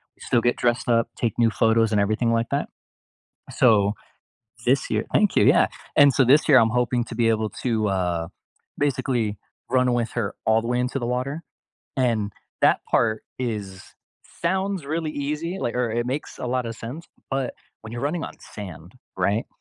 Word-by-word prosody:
we - - -25
still 120 -2 +1
get 120 +1 +2
dressed 120 0 0
up, 115 0 +3
take 115 -4 0
new 115 -2 +3
photos, 115 +2 +3
and 105 -1 +3
everything 110 +3 +1
like 115 0 +1
that. 140 - 0 0.8
So, 105 -5 +4 0.7
this - - +2
year - - 0
Thank - - +3
you, - - +5
yeah, - - +5 0.3
and 145 -1 +8
so 135 - +4
this 145 +6 +4
year 140 - +8
I'm 115 -2 +4
hoping 125 0 +1
to - - -7
be 115 0 +2
able 110 -1 0
to, 110 -4 +1
uh, 90 -3 -1 0.5
basically 130 -6 0 0.3
run 125 -1 +3
with 120 -2 -1
her 110 -5 -2
all 110 0 +4
the 115 - -4
way 125 0 +1
into 125 +2 -1
the 120 - -3
water, 130 +6 -2 0.5
and 115 -5 +1 0.3
that - - +5
part 110 -2 +2 0.2
is, 105 -6 -5 0.5
sounds 190 -1 0
really 155 +1 -2
easy, 150 +6 -3
like, 120 -10 -2
or 125 -2 0
it 120 +1 -1
makes 135 +4 -4
a - - -5
lot 125 -1 -1
of 115 0 -5
sense, 140 +9 -8 0.2
but 135 -2 -2 0.3
when 110 - -9
you're 120 +2 -5
running 160 +4 -1
on - - -7 0.2
sand, 90 -4 -8 0.2
right, 100 +5 0
120 Hz, 185 wpm, -24 LUFS, 110-130 Hz, 0.8 s, and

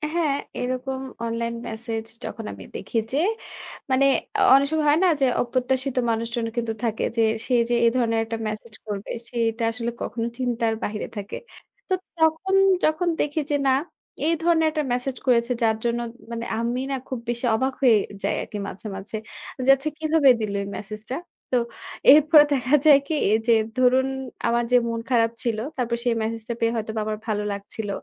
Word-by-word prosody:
হ্যাঁ, 305 -5 +2 0.3
এরকম 255 +1 -3 0.2
online 230 0 -2
message 225 0 -4 0.2
যখন 225 - -6
আমি - - -10
দেখি 230 - -4 0.2
যে - - +1 0.7
মানে, 270 +1 +4 0.5
অনেক 275 +1 +5
সময় 310 -1 +1
হয় 305 +3 +4
না? - - +5
যে, - - +5 0.2
অপ্রত্যাশিত 255 +2 -1 0.2
মানুষজন 230 +1 -2
কিন্তু 230 -1 -1
থাকে 225 -2 -1
যে, - - +4 0.2
সে 255 - -1 0.2
যে 240 - +2
এ - - +7
ধরনের 230 -2 +2
একটা 225 0 -4
মেসেজ 215 +1 -6
করবে 205 -1 -5 0.2
সেটা 230 -1 -1
আসলে 235 +1 -2
কখনো 230 -1 -2
চিন্তার 235 -3 0
বাইরে 210 0 -3
থাকে। 200 -1 -5 0.5
তো - - +2 0.2
তখন 320 +4 +2 0.3
যখন 310 +3 +2
দেখি 295 +2 -1
যে - - +3
না, - - +5 0.6
এই 335 - +4
ধরনের 330 -2 +4
একটা 305 -1 -1
মেসেজ 250 +1 -2
করেছে 240 -1 +3
যার 220 -1 +3
জন্য 235 0 +1 0.3
মানে, 230 0 -4
আমি 240 +2 -1
না? 270 - +1
খুব 260 - -4
বেশি 240 +1 -1
অবাক 260 +4 0
হয়ে 235 -5 +6 0.3
যাই - - +1
আরকি 210 - -7
মাঝে, 200 +3 -8
মাঝে। 195 +3 -7 0.5
যে, - - +2
"আচ্ছা 275 +3 -3
কিভাবে 310 -3 +4
দিলো 205 -2 -2
এই - - -7
মেসেজটা?" 215 +4 -6 0.4
তো 255 - +4 0.5
এরপরে 300 +1 +8
দেখা 260 +1 +2
যায় 290 -3 +8
কি? 320 - -1 0.2
এ - - +4
যে 235 - +6 0.2
ধরুন 255 +1 +4 0.4
আমার 235 +1 +2
যে 250 - +7
মন 230 0 -2
খারাপ 230 -2 +3
ছিল, 230 -3 0 0.2
তারপর 235 -1 -1
সেই 240 -2 +1
মেসেজটা 225 +1 -3
পেয়ে 230 0 +1
হয়তোবা 220 0 -3
আমার 215 0 -2
ভালো 210 -1 -1
লাগছিল। 200 +1 -6
240 Hz, 180 wpm, -24 LUFS, 225-270 Hz, 0.7 s, এরপরে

